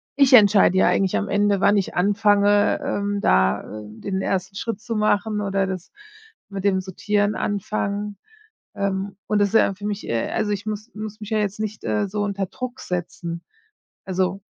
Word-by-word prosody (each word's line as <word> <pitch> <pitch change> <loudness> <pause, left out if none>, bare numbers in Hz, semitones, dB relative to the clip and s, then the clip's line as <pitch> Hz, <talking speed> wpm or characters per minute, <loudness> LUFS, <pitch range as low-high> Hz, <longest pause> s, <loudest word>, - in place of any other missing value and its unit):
ich 275 -2 +4
entscheide 205 -5 +6
ja - - +5
eigentlich 190 -1 +2
am 205 - -2
Ende, 205 -1 +2
wann 205 - +4
ich 195 - -2
anfange, 205 +1 +3
ähm, 205 0 -1
da, 65 +1 +3
äh, 105 +1 -9
den 190 - -4
1. 190 0 -2
Schritt 225 +1 -4
zu 230 -1 -4
machen 210 0 +1
oder 195 -1 0
das 185 -2 -6 0.6
mit 195 -1 -5
dem 195 -2 +2
Sortieren 205 +2 0
anfangen. 205 0 -2 0.6
Ähm. 195 -1 -2
Und 210 - +1
das 205 -1 +3
ist - - -14
ja 195 - +4
für 205 +2 -9
mich, 210 -1 -3
äh 115 -1 -1
also 215 -2 -1
ich 205 +1 -3
muss 215 +2 -5
muss 215 0 -7
mich 210 - -7
ja 220 - +2
jetzt 205 0 -2
nicht, 215 0 -4
äh, 110 - 0
so 205 +2 -2
unter 200 -2 -2
Druck 255 +5 -6
setzen, 170 -1 -5 0.6
also, 190 +1 -1
200 Hz, 185 wpm, -23 LUFS, 190-210 Hz, 0.6 s, entscheide